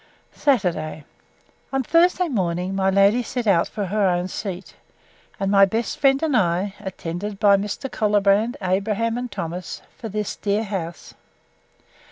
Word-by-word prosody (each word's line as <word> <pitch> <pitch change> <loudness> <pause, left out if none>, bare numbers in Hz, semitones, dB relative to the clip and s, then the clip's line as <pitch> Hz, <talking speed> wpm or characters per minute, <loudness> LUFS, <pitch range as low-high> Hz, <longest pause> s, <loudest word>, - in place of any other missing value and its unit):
Saturday. 175 - 0 0.7
On 270 -1 0
Thursday 350 +5 +3
morning 185 - -1
my 190 0 +2
lady 200 +5 +4
set 245 0 -4
out 185 -5 +3
for 210 -2 -4
her 200 +1 +1
own 175 0 0
seat; 190 -1 -6 0.7
and 195 0 0
my 195 -1 +6
best 220 +4 0
friend 275 +1 +3
and 305 -4 +1
I, 190 -1 +1
attended 190 +1 -5
by 205 -2 +6
Mr. 205 +7 -3
Colbrand, 210 +2 +2
Abraham, 210 +5 0
and 245 0 -4
Thomas, 180 -2 -5
for 225 - -7
this 210 0 -3
dear 205 +1 -1
house. 185 -5 -5
200 Hz, 145 wpm, -22 LUFS, 185-230 Hz, 0.7 s, my